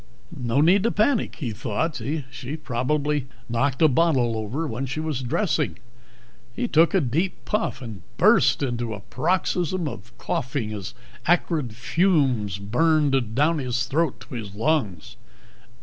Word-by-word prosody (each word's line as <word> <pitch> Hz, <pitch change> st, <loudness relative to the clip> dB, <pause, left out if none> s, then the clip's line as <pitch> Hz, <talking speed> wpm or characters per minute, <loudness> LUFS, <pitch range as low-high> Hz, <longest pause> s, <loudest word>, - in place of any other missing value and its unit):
No 125 Hz, 0 st, +1 dB
need 180 Hz, +6 st, +5 dB
to 230 Hz, +3 st, +1 dB
panic, 220 Hz, +3 st, +1 dB
he 130 Hz, -8 st, -4 dB
thought. 125 Hz, +8 st, -2 dB, 0.3 s
She 135 Hz, +5 st, -6 dB
probably 145 Hz, +1 st, -1 dB, 0.2 s
knocked 130 Hz, +5 st, 0 dB
a -, -, +8 dB
bottle 130 Hz, -5 st, +2 dB
over 110 Hz, +9 st, -3 dB
when 135 Hz, -1 st, -3 dB
she 135 Hz, -, -4 dB
was 155 Hz, -4 st, -2 dB
dressing. 135 Hz, -, 0 dB, 0.8 s
He 245 Hz, -, -1 dB
took 165 Hz, -1 st, +4 dB
a -, -, +5 dB
deep 160 Hz, +9 st, -1 dB
puff, 210 Hz, -10 st, -1 dB
and 110 Hz, -6 st, -8 dB, 0.2 s
burst -, -, +4 dB
into 120 Hz, -4 st, -2 dB
a 100 Hz, -, -10 dB
paroxysm 175 Hz, -, 0 dB
of -, -, -8 dB
coughing 125 Hz, -4 st, -2 dB
as 100 Hz, -4 st, -6 dB, 0.3 s
acrid 160 Hz, -8 st, +1 dB
fumes 130 Hz, -, +1 dB
burned 135 Hz, +2 st, +1 dB
down 155 Hz, +4 st, +3 dB
his 125 Hz, -2 st, -1 dB
throat 135 Hz, -3 st, 0 dB
to 115 Hz, +4 st, -11 dB
his 105 Hz, -5 st, -6 dB
lungs. 110 Hz, -, -1 dB
135 Hz, 145 wpm, -24 LUFS, 115-160 Hz, 0.8 s, a